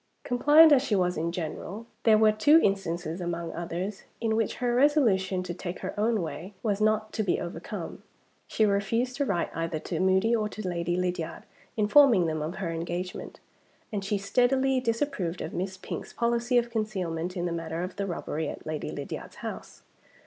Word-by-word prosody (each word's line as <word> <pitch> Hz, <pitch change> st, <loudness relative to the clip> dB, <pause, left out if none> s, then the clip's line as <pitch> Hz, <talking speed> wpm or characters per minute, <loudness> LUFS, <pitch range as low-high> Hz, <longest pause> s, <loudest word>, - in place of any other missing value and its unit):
Compliant 295 Hz, +6 st, +6 dB
as 275 Hz, -3 st, +6 dB
she 260 Hz, -6 st, 0 dB
was 180 Hz, -2 st, +1 dB
in 165 Hz, +2 st, -1 dB
general, 180 Hz, +6 st, -5 dB, 0.2 s
there 220 Hz, -2 st, +7 dB
were 215 Hz, 0 st, +5 dB
two 290 Hz, +10 st, +5 dB
instances, 175 Hz, -3 st, -1 dB
among 170 Hz, -1 st, -3 dB
others, 175 Hz, +4 st, -4 dB, 0.2 s
in 225 Hz, -1 st, 0 dB
which 225 Hz, -2 st, 0 dB
her 245 Hz, -1 st, 0 dB
resolution 225 Hz, -10 st, +3 dB
to 180 Hz, -1 st, -4 dB
take 180 Hz, 0 st, -6 dB
her -, -, -4 dB
own 215 Hz, -2 st, +1 dB
way 165 Hz, +6 st, -7 dB
was 210 Hz, -2 st, 0 dB
not 215 Hz, 0 st, +1 dB
to -, -, -1 dB
be 200 Hz, -4 st, +1 dB
overcome. 175 Hz, +5 st, -6 dB, 0.5 s
She 220 Hz, -, +2 dB
refused 220 Hz, +5 st, 0 dB
to 285 Hz, -, +1 dB
write 175 Hz, -9 st, -1 dB
either 165 Hz, -1 st, -2 dB
to 160 Hz, +1 st, -4 dB
Moody 190 Hz, +5 st, +3 dB
or 215 Hz, -2 st, 0 dB
to 215 Hz, -2 st, -6 dB
Lady 175 Hz, -1 st, -1 dB
Lydiard 180 Hz, -2 st, -2 dB, 0.3 s
informing 215 Hz, -2 st, +6 dB
them 155 Hz, -1 st, -1 dB
of 160 Hz, +4 st, -3 dB
her 185 Hz, -4 st, -3 dB
engagement; 175 Hz, +2 st, -5 dB, 0.5 s
and 200 Hz, -2 st, -2 dB
she 200 Hz, +1 st, 0 dB
steadily 255 Hz, +6 st, +2 dB
disapproved 230 Hz, -, -1 dB
of -, -, -5 dB
Miss 185 Hz, +1 st, -3 dB
Pink's -, -, -7 dB
policy 235 Hz, +1 st, +1 dB
of 235 Hz, 0 st, +1 dB
concealment, 185 Hz, -6 st, -2 dB
in 175 Hz, -, -1 dB
the 175 Hz, -, -1 dB
matter 165 Hz, 0 st, -3 dB
of 185 Hz, +1 st, -6 dB
the 200 Hz, 0 st, -2 dB
robbery 160 Hz, -3 st, -3 dB
at -, -, -8 dB
Lady 155 Hz, -1 st, -4 dB
Lydiard's -, -, -6 dB
house. -, -, -7 dB
195 Hz, 185 wpm, -28 LUFS, 175-230 Hz, 0.5 s, there